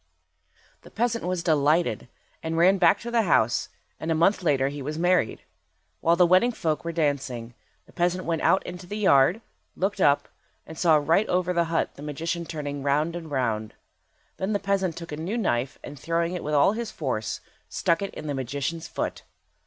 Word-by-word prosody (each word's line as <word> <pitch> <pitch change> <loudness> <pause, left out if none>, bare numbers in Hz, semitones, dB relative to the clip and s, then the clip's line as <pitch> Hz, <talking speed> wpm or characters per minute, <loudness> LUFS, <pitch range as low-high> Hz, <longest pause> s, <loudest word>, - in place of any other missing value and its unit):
The - - -14
peasant 230 -2 -1
was 180 -1 -2
delighted, 155 +1 +2 0.3
and 165 0 -3
ran 185 +3 +5
back - - +5
to 235 - -6
the 235 -1 +3
house, 125 - +2 0.3
and 160 - -4
a - - +2
month 185 +5 +3
later 140 -5 +2
he 145 0 -6
was 150 +3 -4
married. 175 -8 +1 0.6
While 170 +1 +3
the 180 +1 +5
wedding 185 +8 +4
folk 160 -7 -1
were 170 - -3
dancing, 135 -7 -2 0.3
the - - -21
peasant 180 +1 0
went 165 -1 -1
out 190 - +3
into 180 0 -8
the 205 - -5
yard, 180 - +4 0.3
looked 195 +1 -1
up, 145 -3 +3 0.4
and 160 - -10
saw 160 -1 +4
right 160 +7 +2
over 180 0 +1
the 170 -1 +2
hut 165 0 0
the - - -10
magician 165 +4 -3
turning 145 -3 -5
round 150 +4 +1
and 165 -2 -7
round. 115 -6 -2 0.6
Then 190 +3 -1
the - - +3
peasant 195 -4 -1
took 170 -2 -8
a 150 - -4
new 180 +9 -3
knife, 130 - -1
and 145 -1 -9
throwing 170 +3 -1
it 180 - -4
with 150 0 -1
all 145 +6 +5
his 230 +1 -4
force, 125 -8 -3 0.3
stuck 165 +1 +1
it 200 - -3
in - - -7
the 145 - -2
magician's 140 +5 -3
foot. - - -4
165 Hz, 195 wpm, -26 LUFS, 145-180 Hz, 0.6 s, ran